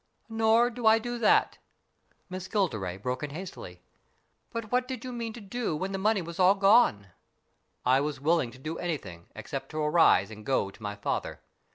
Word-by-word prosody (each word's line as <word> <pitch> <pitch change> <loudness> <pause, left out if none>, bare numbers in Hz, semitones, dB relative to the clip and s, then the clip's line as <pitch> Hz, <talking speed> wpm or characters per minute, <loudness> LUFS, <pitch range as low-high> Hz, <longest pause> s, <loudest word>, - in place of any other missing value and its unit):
" - - -45
Nor 225 +2 +3
do 235 -1 -2
I 220 +1 +7
do 240 +1 -4
that." 220 - +3 0.7
Miss 185 -1 -6
Gilderay 110 - -1
broke 125 +5 -3
in 150 - -4
hastily. 180 +6 -9 0.7
"But 230 -3 -6
what 250 0 +1
did 255 -2 -6
you 255 - -5
mean 230 -1 -4
to 240 - -9
do 210 -3 -3
when 190 +5 -3
the 195 - -3
money 210 -1 +1
was 170 +1 -8
all 185 +2 +6
gone? 195 - +4 0.2
" - - -46
" - - -43
I 130 +2 +4
was 145 -1 -3
willing 155 -2 +2
to 130 - -14
do 155 +5 -6
anything, 100 - -5
except - - -6
to 155 - -7
arise 150 - +4
and 110 0 -10
go 105 -5 0
to 110 - -19
my 105 -1 -4
father. 100 - -3
180 Hz, 205 wpm, -28 LUFS, -, 0.7 s, I